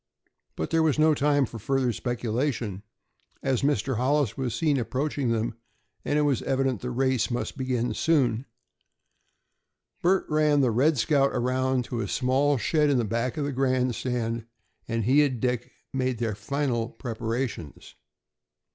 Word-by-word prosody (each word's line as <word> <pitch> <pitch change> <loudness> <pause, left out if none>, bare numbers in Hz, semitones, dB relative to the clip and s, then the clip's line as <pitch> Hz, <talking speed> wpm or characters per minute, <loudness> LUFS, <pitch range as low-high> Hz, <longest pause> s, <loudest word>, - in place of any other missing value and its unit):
But 80 - -4
there 165 - +3
was 155 -3 +2
no 155 0 +5
time 145 -1 +2
for 115 -1 -8
further 130 +2 0
speculation, 120 -3 -2 0.6
as 130 -3 +1
Mr. 135 -3 0
Hollis 130 -2 +1
was 125 -4 -2
seen 145 0 +1
approaching 135 +2 -1
them, 115 0 0 0.5
and 145 - 0
it 150 - +3
was 140 -5 +1
evident 135 -3 0
the 125 - -3
race 130 -1 +1
must 120 0 -2
soon - - -22 0.8
begin. 120 +5 -7 1.6
Bert 185 +2 +3
ran 150 -1 +3
the 125 -3 +3
"Red 140 +7 +3
Scout" 140 +3 +3
around 130 +1 +1
to 120 -1 -3
a - - -2
small 135 +2 +2
shed 150 +6 +2
in 125 -5 +2
back 115 +5 -2
of 145 - -1
the 145 - -2
grandstand, 125 -3 -1 0.4
and 115 -1 -1
he 135 +7 +5
and 130 -5 -1
Dick 125 -1 -1 0.2
made 130 -2 0
their 110 -2 -1
final 120 +1 -2
preparations. 115 - -5
130 Hz, 150 wpm, -26 LUFS, 115-140 Hz, 1.6 s, no